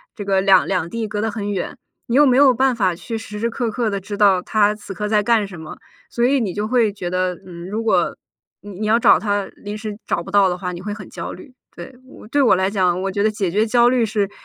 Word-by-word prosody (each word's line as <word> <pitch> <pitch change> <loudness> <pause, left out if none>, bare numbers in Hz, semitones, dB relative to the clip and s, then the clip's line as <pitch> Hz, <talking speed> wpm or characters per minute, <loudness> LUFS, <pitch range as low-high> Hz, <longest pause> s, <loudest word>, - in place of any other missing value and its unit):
这 205 - -7
个 195 -1 +2
两 190 -2 +5
两 180 -4 -1
地， 225 +3 -3
隔 210 0 -3
得 225 - 0
很 205 -1 -4
远， 190 -3 -4 0.3
你 235 - -1
又 295 +2 +6
没 255 -2 +4
有 275 -2 +6
办 260 +2 +2
法 190 -6 +1
去 225 +6 -6
时 210 -1 -8
时 235 +2 0
刻 235 0 -2
刻 235 -1 -1
地 200 -1 -2
知 205 +2 -7
道 195 -3 +4
他 210 +2 +2
此 205 -2 -9
刻 210 +3 -4
在 210 -1 +3
干 225 -1 +2
什 185 -4 -10
么， 155 - -9 0.3
所 235 - -2
以 275 +2 +3
你 205 -7 -2
就 210 +2 -2
会 235 -4 +2
觉 180 -3 -5
得， 185 0 -1
嗯， 175 -1 -9
如 220 +3 -3
果 185 -6 +1 0.5
你 205 +2 -10
你 215 - -2
要 225 - +4
找 - - +5
他 205 -2 -1
临 205 0 -7
时 215 -1 -6
找 - - 0
不 190 - -10
到 200 -1 +5
的 180 - -3
话， 180 0 -4
你 175 0 -7
会 205 +2 -4
很 205 - -10
焦 - - -6
虑。 265 - -13 0.2
对， 265 - -10 0.3
对 285 +4 +2
我 245 -8 +4
来 190 +1 +1
讲， 185 -3 +1
我 195 - -2
觉 200 +1 -1
得 215 - +2
解 200 -4 -2
决 210 +5 +1
焦 240 +1 +4
虑 245 -2 +2
是 205 -2 -1
205 Hz, 290 characters per minute, -20 LUFS, 190-225 Hz, 0.5 s, 又